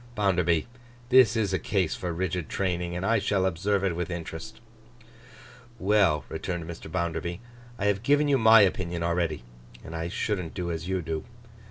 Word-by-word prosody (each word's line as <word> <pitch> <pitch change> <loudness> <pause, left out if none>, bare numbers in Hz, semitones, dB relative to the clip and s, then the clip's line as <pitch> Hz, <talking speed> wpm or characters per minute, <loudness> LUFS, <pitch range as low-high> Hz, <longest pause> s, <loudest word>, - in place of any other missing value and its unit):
Bounderby, 90 -6 +2 0.4
this 130 -2 +6
is 105 -4 0
a 95 - +1
case 90 -1 0
for 90 - -4
rigid 90 -1 -2
training, 90 -2 -2
and 90 +2 -3
I 115 +1 +3
shall 100 -1 +1
observe 95 +3 0
it 95 -4 0
with 90 0 -3
interest.' 90 +5 -6 1.2
'Well,' 95 -8 +2
returned 85 -2 -4
Mr. 80 -2 -8
Bounderby, 85 0 -2 0.4
'I 100 - -2
have 100 -1 +1
given 145 +5 +3
you 140 -2 +3
my 110 0 +8
opinion 90 -3 0
already, 85 -4 -1 0.4
and 80 - -8
I 80 0 -3
shouldn't 95 -3 -3
do 90 -1 -3
as 80 0 -4
you 95 -2 -1
do. 80 -1 -3
90 Hz, 170 wpm, -27 LUFS, 85-100 Hz, 1.2 s, my